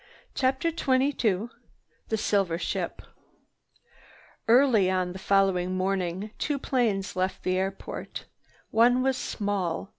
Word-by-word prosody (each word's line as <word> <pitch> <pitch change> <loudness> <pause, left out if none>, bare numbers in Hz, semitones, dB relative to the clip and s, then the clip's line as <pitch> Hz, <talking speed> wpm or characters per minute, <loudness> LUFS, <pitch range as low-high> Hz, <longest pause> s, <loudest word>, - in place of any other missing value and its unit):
CHAPTER 265 +5 +1
XXII 260 - +1 0.6
THE 220 - 0
SILVER 195 -5 +1
SHIP - - -3 1.4
Early 230 -5 +5
on 185 -1 0
the 190 - -8
following 185 -2 +2
morning 190 +1 -1
two 295 -2 0
planes 230 -8 0
left 185 +1 -2
the 185 - +1
airport. 195 +1 -5 0.5
One 245 +3 +4
was 265 0 +2
small. 200 -6 -2
200 Hz, 110 wpm, -27 LUFS, 185-250 Hz, 1.4 s, Early